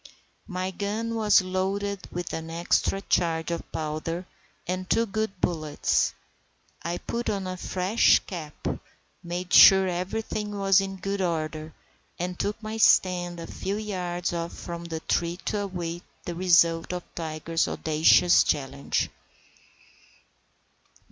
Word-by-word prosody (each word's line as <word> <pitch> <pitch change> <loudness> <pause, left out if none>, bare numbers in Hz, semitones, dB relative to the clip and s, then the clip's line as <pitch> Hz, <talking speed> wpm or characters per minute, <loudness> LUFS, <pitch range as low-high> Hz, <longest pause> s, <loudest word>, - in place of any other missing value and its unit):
My 185 -1 -3
gun 210 +4 -3
was 215 -4 +4
loaded 195 +2 -2
with 175 0 -4
an 160 0 -4
extra 170 +3 +1
charge 165 -3 0
of 170 - -5
powder 160 +3 -3 0.4
and 185 +1 -3
two 230 - +3
good 215 -2 -3
bullets. 155 -5 0 0.7
I 170 +1 -3
put 235 +5 -3
on 195 -2 -2
a 185 0 -3
fresh 185 +4 +3
cap, 160 -5 -7 0.5
made 175 +1 -5
sure 190 -1 +9
everything 205 +3 -3
was 195 -1 +4
in 195 0 -4
good 195 +1 -3
order, 155 -3 -2 0.4
and 180 +1 -4
took 210 +2 -2
my 215 +1 -4
stand 175 -5 +3
a 165 - -6
few 195 +4 -4
yards 180 -5 -3
off 170 0 -3
from 170 0 -7
the 165 -1 -5
tree 170 +1 0
to 210 - -1
await 175 -4 -4 0.2
the 175 - -3
result 170 -1 +3
of 180 -1 -4
Tiger's 165 0 -2
audacious 160 +3 +4
challenge. 140 -1 -1
180 Hz, 130 wpm, -26 LUFS, 170-195 Hz, 0.7 s, sure